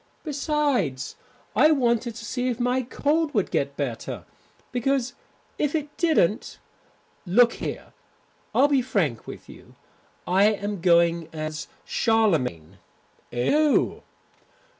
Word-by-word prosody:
Besides, 280 - -1 0.4
I 305 - +6
wanted 240 -5 +1
to 230 - -8
see 250 +1 -2
if 245 -1 -3
my 250 +1 +1
cold 295 +5 0
would - - +1
get - - -1
better. - - -4 0.5
Because 260 +1 0 0.5
if 295 +1 0
it 295 -2 -3
didn't 275 - +1 0.7
Look 235 +7 +5
here, - - -6 0.6
I'll 280 - +6
be 280 -3 +3
frank 165 - -1
with - - -9
you. - - -15 0.5
I 190 +3 +4
am 205 -2 0
going 170 -2 +3
as 155 -1 -5 0.2
Charlemagne." 130 - +1 0.5
"Oh!" 290 - +2
235 Hz, 115 wpm, -25 LUFS, 170-280 Hz, 0.7 s, I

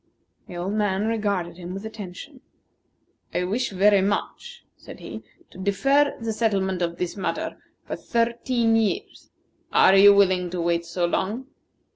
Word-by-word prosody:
The - - -9
old 185 +3 -3
man 205 -1 0
regarded 200 -6 -1
him 180 +1 -7
with 195 +2 -7
attention. 220 +6 -9 0.9
"I 180 - +1
wish 215 +8 -1
very 200 +1 +4
much," 205 - -3
said - - -12
he, - - -8 0.3
"to - - -13
defer 275 +10 +2
the 230 -2 -3
settlement 195 -5 0
of 170 0 -2
this 180 -1 -3
matter 195 - -3 0.3
for - - -4
thirteen 235 0 0
years. 220 -3 -2 0.4
Are 190 - +6
you 200 +1 +8
willing 185 -3 +3
to 180 0 -4
wait 170 0 0
so 175 +1 -1
long?" 210 +8 -2
200 Hz, 150 wpm, -24 LUFS, 180-225 Hz, 0.9 s, you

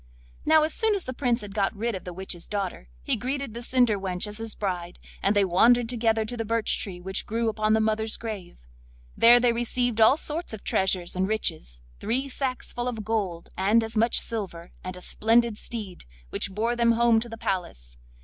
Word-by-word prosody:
Now, 315 0 +6
as 310 0 0
soon 445 -2 +2
as 390 - -2
the 255 - -5
Prince 245 -2 0
had 205 -1 -8
got 200 0 0
rid 230 +3 -2
of 190 - -6
the 180 - -5
witch's 175 -1 -6
daughter 195 - -4
he - - +1
greeted 270 -1 -3
the 235 - -6
cinder 245 -4 +2
wench 185 -1 -1
as 210 +1 -6
his 225 -1 -5
bride, 180 -3 -3 0.2
and 200 +2 +2
they 200 -1 +4
wandered 230 +7 +4
together 225 -2 +1
to 245 - -5
the 230 - -2
birch 225 0 0
tree 185 -4 -5
which 190 +2 -2
grew 230 +1 0
upon 215 0 +1
the 220 - +4
mother's 220 0 0
grave. 210 -6 -7 0.6
There 240 +1 +8
they 240 -1 +3
received 240 -1 0
all 220 +6 +7
sorts 320 -2 -2
of 215 - -8
treasures 185 -2 +1
and 185 +1 +1
riches, - - -2 0.2
three 255 +6 -1
sacks 260 -1 -3
full 245 0 -3
of 225 -4 -4
gold, 195 -7 -2
and 210 +5 +3
as 225 0 -5
much 225 +2 +4
silver, 185 -6 -4
and 185 0 -6
a - - -10
splendid 225 +2 +2
steed, 210 - -7 0.3
which - - -1
bore 225 +5 -1
them 235 -1 +3
home 230 -1 +4
to 235 +1 -6
the 225 - -8
palace. - - -4
220 Hz, 210 wpm, -26 LUFS, 190-235 Hz, 0.6 s, There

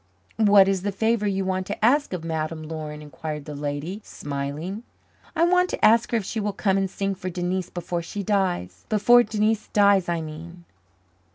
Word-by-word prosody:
"What 205 -3 +6
is 195 -2 +1
the 205 +2 -2
favour 220 +1 +1
you 195 -1 -1
want 185 0 -1
to 205 +1 -1
ask 285 +5 +3
of 180 -3 -4
Madame 160 -1 -3
Laurin?" 155 -1 -6
inquired 150 +1 -6
the 150 - -7
lady, 145 +7 -4
smiling. 145 +8 -5 0.5
"I 330 - +3
want 360 +1 +3
to - - +1
ask 225 +1 +5
her 235 - +1
if 210 - -3
she 225 - -3
will 205 -1 -2
come 195 -1 +1
and 195 -1 0
sing 195 +1 -2
for 185 -1 -5
Denise 180 0 -2
before 175 0 -4
she 200 +4 -5
dies 175 - -1
before 240 +3 +6
Denise 215 -1 0
dies, 200 -3 +3
I 170 -1 0
mean. 165 +3 -9
190 Hz, 190 wpm, -24 LUFS, 160-210 Hz, 0.5 s, What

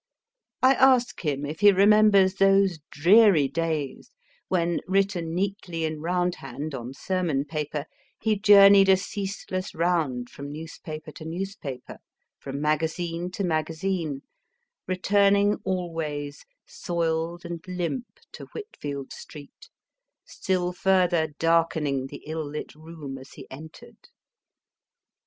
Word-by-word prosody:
I 260 +1 +7
ask 255 -2 +3
him 145 -2 -1
if 150 +2 -6
he 205 0 +7
remembers 200 -1 +5
those 195 -3 +3
dreary 180 -2 +5
days 160 -3 -3 0.4
when, 170 -2 0
written 190 -4 0
neatly 185 -3 -2
in 155 -1 -4
round 180 +1 0
hand 140 +1 -7
on 125 0 -6
sermon 170 -6 -1
paper, 150 -1 -4 0.3
he 220 0 +1
journeyed 200 -1 +7
a 190 - +7
ceaseless 190 -1 -5
round 160 -8 0
from 140 0 -8
newspaper 155 0 -8
to 155 - -11
newspaper, 165 -7 -6 0.4
from 140 0 -6
magazine 165 +3 -1
to 200 - -3
magazine, 160 -2 -2 0.6
returning 200 +2 +3
always 165 -6 -4 0.2
soiled 170 0 -3
and 170 -1 -6
limp 180 +7 -3 0.2
to - - -10
Whitfield 145 - -6
Street, 145 -2 -12 0.6
still 180 -2 -1
further 180 -3 +2
darkening 160 -5 +1
the 140 +1 -11
ill 160 +1 -4
lit 150 +1 -6
room 155 -3 -9
as 130 - -14
he - - -11
entered. 155 +4 -12
170 Hz, 115 wpm, -25 LUFS, 150-190 Hz, 0.6 s, I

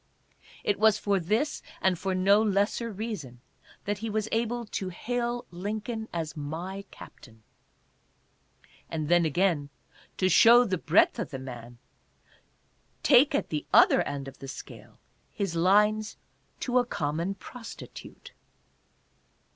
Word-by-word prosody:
It 205 - 0
was 220 -1 +5
for 200 -2 0
this 215 - -1 0.2
and 190 -1 +2
for 190 +2 -2
no 200 +3 +4
lesser 210 +2 0
reason 195 - -6 0.5
that 205 -1 -2
he 225 +1 -4
was 215 0 -1
able 235 +1 -1
to 195 -3 -4
hail 240 +5 -3
Lincoln 215 +5 -4
as 165 -2 -4
"My 170 +7 -5
Captain." 110 -2 -14 1.5
And 155 -2 -3
then 175 -1 +4
again, 160 -2 +1 0.5
to 185 - +2
show 230 +7 +7
the 185 -5 -1
breadth 165 +3 +3
of - - -3
the 135 - -5
man, 120 -2 -9 1.3
take 280 +2 +5
at - - -1
the 150 -2 -3
other - - +6
end 140 -1 -4
of 135 - -11
the 135 - -8
scale 135 - -10 0.3
his 195 -4 -3
lines 210 +5 +3 0.4
"To 250 -1 +2
a - - +3
Common 165 +2 -2
Prostitute." 235 +2 -11
195 Hz, 130 wpm, -28 LUFS, 160-220 Hz, 1.5 s, show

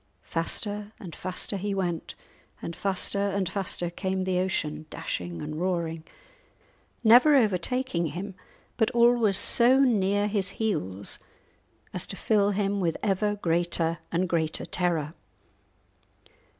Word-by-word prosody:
Faster 205 +5 -2
and 175 -4 -9
faster 185 +2 -3
he 200 +1 -2
went, 175 -4 -3 0.4
and 170 - -6
faster 195 0 -1
and 200 -1 0
faster 175 -2 -2
came 190 +1 -2
the 185 -1 0
ocean, 155 -4 -2
dashing 85 -1 -5
and 155 +2 -5
roaring, 170 -3 -2 1.0
never 245 +7 +7
overtaking 215 -4 +1
him, 190 +5 -6 0.4
but 220 - +2
always 235 -4 +4
so 250 +3 +5
near 205 -6 +2
his 200 -3 0
heels 100 - -1 0.7
as - - 0
to - - -6
fill 205 -2 +2
him 200 0 0
with 170 -4 0
ever 205 +1 +1
greater 170 -2 0
and 180 +2 0
greater 160 -2 0
terror. 165 -4 0
190 Hz, 125 wpm, -27 LUFS, 170-205 Hz, 1.0 s, never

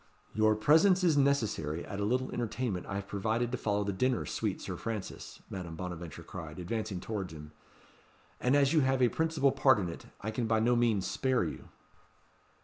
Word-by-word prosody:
"Your 110 0 +3
presence 165 - +5
is 165 -4 +4
necessary 110 - +1
at 100 - -6
a 100 - 0
little 130 +4 0
entertainment 115 -5 -2
I 100 - -4
have 100 0 -4
provided 110 +4 -1
to 125 - -1
follow 105 -1 0
the 100 0 -2
dinner, 125 +5 +1
sweet - - -2
Sir - - -5
Francis," 110 -4 -6
Madame 85 -4 -6
Bonaventure 85 -2 -6
cried, 80 -4 -8
advancing 100 +2 -3
towards 95 -4 -4
him; 75 -1 -10 0.9
"and 125 +3 +2
as 140 +1 +4
you 160 - +5
have 135 -2 +2
a 120 - +5
principal 160 -3 +2
part 135 -2 +4
in 90 -4 -2
it, 85 - -9
I 110 - -3
can 115 +1 -2
by 110 0 +3
no 120 +2 +3
means 115 -5 +2
spare 130 +7 +1
you." - - -6
110 Hz, 190 wpm, -31 LUFS, 95-130 Hz, 0.9 s, presence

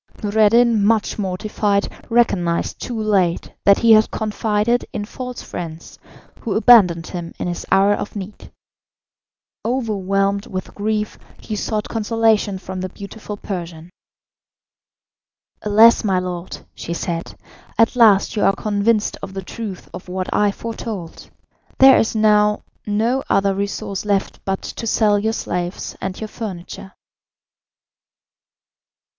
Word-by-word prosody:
Noureddin, 220 +1 +4
much 220 0 +1
mortified, 200 +1 -1 0.2
recognised 195 -8 +1
too 235 -3 -4
late 195 -5 0
that 200 0 +6
he 230 - +4
had 215 0 +6
confided 215 +2 0
in 205 - -4
false 250 +3 -7
friends, 165 -1 -8 0.4
who 220 - -3
abandoned 195 -8 +6
him 170 -1 -7
in - - -3
his 175 -1 -5
hour 195 +1 +5
of 205 - -5
need. 205 +1 -8 1.1
Overwhelmed 200 -4 0
with 185 -1 -6
grief, 210 +1 -2 0.2
he 215 - -5
sought 210 0 -2
consolation 220 -2 +1
from 185 0 -6
the 185 - -3
beautiful 205 +2 -8
Persian. 175 -4 -7 1.7
"Alas, 220 +3 +5
my 195 -3 +1
lord," 180 -1 -5
she 170 - -5
said, 170 -1 -4 0.4
"at 230 +1 +3
last 220 -5 +5
you 210 - 0
are 195 - +4
convinced 210 +1 0
of 190 - -8
the 195 - -4
truth 200 -1 -7
of 180 0 -9
what 185 0 -3
I 210 0 +3
foretold. 220 -5 -7 0.5
There 265 0 +8
is 225 - 0
now 210 -1 +3 0.2
no 225 +6 +1
other 195 0 +2
resource 200 0 -3
left 200 -2 -1
but 195 0 -2
to 230 - -6
sell 210 -2 +3
your 220 +2 0
slaves 180 -3 -4
and 190 0 -4
your 220 - -4
furniture." 190 -3 -8
205 Hz, 130 wpm, -20 LUFS, 190-220 Hz, 1.7 s, There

